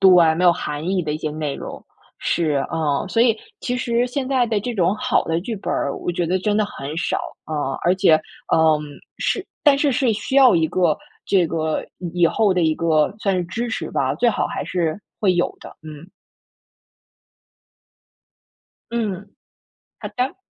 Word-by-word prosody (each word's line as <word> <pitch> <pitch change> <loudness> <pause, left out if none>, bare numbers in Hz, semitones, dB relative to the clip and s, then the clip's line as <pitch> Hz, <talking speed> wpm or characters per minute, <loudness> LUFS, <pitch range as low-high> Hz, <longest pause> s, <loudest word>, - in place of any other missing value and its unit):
对， 180 -4 +6
没 180 - +1
有 175 - +7
含 150 0 -4
义 190 -1 +1
的 150 -2 -2
一 155 - -3
些 155 - -3
内 150 -2 -3
容。 - - -8 0.3
是， 160 -3 0 0.2
啊， 155 0 0
所 225 - +1
以 230 -3 +3 0.2
其 245 - -2
实 240 0 +1
现 260 +1 -3
在 260 -2 +2
的 220 -2 0
这 245 +3 -3
种 185 0 +2
好 255 +1 +1
的 165 0 0
剧 225 +6 -4
本 195 - -3
儿， 140 - -1
我 - - -3
觉 175 -1 -1
得 185 +3 +1
真 205 +2 0
的 215 - +3
很 150 -6 -7
少， 170 - 0 0.3
啊， 145 -3 -2
而 175 - +4
且， 190 -4 +5 0.4
嗯， 160 -1 +4 0.4
是 400 - -1 0.2
但 290 -2 +6
是， 280 0 +2
是 255 -2 +2
需 210 +6 -4
要 265 -7 +7
一 160 -1 +2
个， 175 -2 +2 0.3
这 185 -4 +3
个， 160 -1 -2
以 175 0 -5
以 - - +8
后 205 +2 +2
的 180 - +2
一 160 -1 +2
个 160 +1 +2
算 195 -3 0
是 180 - -1
支 235 +7 -3
持 170 -8 -4
吧， 130 -1 0
最 240 0 +3
好 - - 0
还 - - -4
是 170 -1 -1 0.2
会 190 -4 +3
有 175 - 0
的， - - -12
嗯。 155 +2 -10 2.8
嗯， 205 -4 -3 0.6
好 - - -6
的， 255 +2 -2
180 Hz, 200 characters per minute, -21 LUFS, 160-225 Hz, 2.8 s, 以